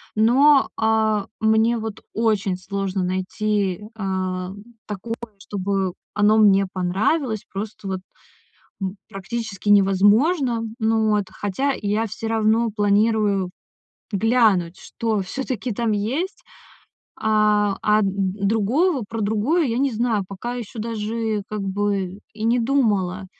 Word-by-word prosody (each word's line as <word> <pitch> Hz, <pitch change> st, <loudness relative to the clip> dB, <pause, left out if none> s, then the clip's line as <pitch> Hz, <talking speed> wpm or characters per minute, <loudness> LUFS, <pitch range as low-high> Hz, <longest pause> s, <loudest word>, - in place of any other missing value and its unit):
Но, 270 Hz, +6 st, +5 dB
а, 220 Hz, -2 st, +1 dB
мне 220 Hz, +2 st, +3 dB
вот 220 Hz, -1 st, -5 dB
очень 210 Hz, -4 st, +1 dB
сложно 195 Hz, 0 st, -3 dB
найти, 190 Hz, +1 st, -1 dB
э, -, -, -12 dB
такое, 185 Hz, -2 st, -3 dB, 0.9 s
чтобы 195 Hz, -2 st, -2 dB, 0.2 s
оно 210 Hz, +1 st, +4 dB
мне 200 Hz, -2 st, +5 dB
понравилось. 215 Hz, -, 0 dB
Просто 205 Hz, 0 st, -6 dB
вот, 190 Hz, -1 st, -2 dB, 0.8 s
м, 190 Hz, 0 st, -3 dB
практически 205 Hz, 0 st, -5 dB
невозможно, 215 Hz, -, +4 dB, 0.2 s
ну, 220 Hz, -1 st, +2 dB
вот. 210 Hz, -1 st, +2 dB
Хотя, 265 Hz, +8 st, -1 dB
я 210 Hz, +2 st, 0 dB
всё 220 Hz, +1 st, -5 dB
равно 225 Hz, +1 st, +2 dB
планирую 205 Hz, -2 st, +2 dB, 0.6 s
глянуть, 205 Hz, -5 st, +2 dB
что 220 Hz, -3 st, -2 dB
всё-таки 255 Hz, +3 st, -4 dB
там 230 Hz, +1 st, -1 dB
есть. 280 Hz, -, -2 dB, 0.8 s
А, 210 Hz, -2 st, +2 dB
а, 215 Hz, 0 st, +3 dB
д 195 Hz, -, +1 dB, 0.4 s
другую 255 Hz, -, +2 dB
в -, -, -5 dB
про 225 Hz, 0 st, -4 dB
другое 220 Hz, +12 st, +1 dB
я 235 Hz, -1 st, -1 dB
не 275 Hz, 0 st, +2 dB
знаю. 220 Hz, -3 st, 0 dB
Пока 200 Hz, +5 st, -5 dB
ещё 235 Hz, -2 st, -7 dB
даже 220 Hz, -1 st, -2 dB
как 215 Hz, 0 st, -4 dB
бы 195 Hz, -1 st, -1 dB, 0.2 s
и 215 Hz, -, -5 dB
не 235 Hz, +2 st, +3 dB
думала. 210 Hz, -7 st, +1 dB
215 Hz, 125 wpm, -22 LUFS, 195-230 Hz, 0.9 s, Но